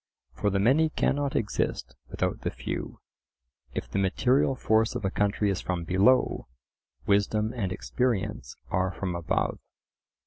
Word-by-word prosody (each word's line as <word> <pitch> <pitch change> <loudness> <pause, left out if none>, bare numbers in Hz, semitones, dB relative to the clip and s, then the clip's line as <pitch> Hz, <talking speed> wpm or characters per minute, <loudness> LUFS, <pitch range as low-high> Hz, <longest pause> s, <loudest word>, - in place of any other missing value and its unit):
For 105 - 0
the 100 - 0
many 135 +11 +4
cannot 145 -2 0
exist 65 - -1
without - - -2
the - - -1
few, - - -5 0.8
if - - -3
the 100 - -2
material 125 +8 +2
force 110 -2 +2
of - - -3
a 95 - 0
country 105 0 +1
is 95 - -2
from 90 -2 -2
below, 95 +10 +3 0.6
wisdom 105 +2 +2
and 100 -7 -2
experience 105 - -2
are 95 0 +1
from 90 -1 -3
above. 85 -1 -1
105 Hz, 140 wpm, -27 LUFS, 95-120 Hz, 0.8 s, many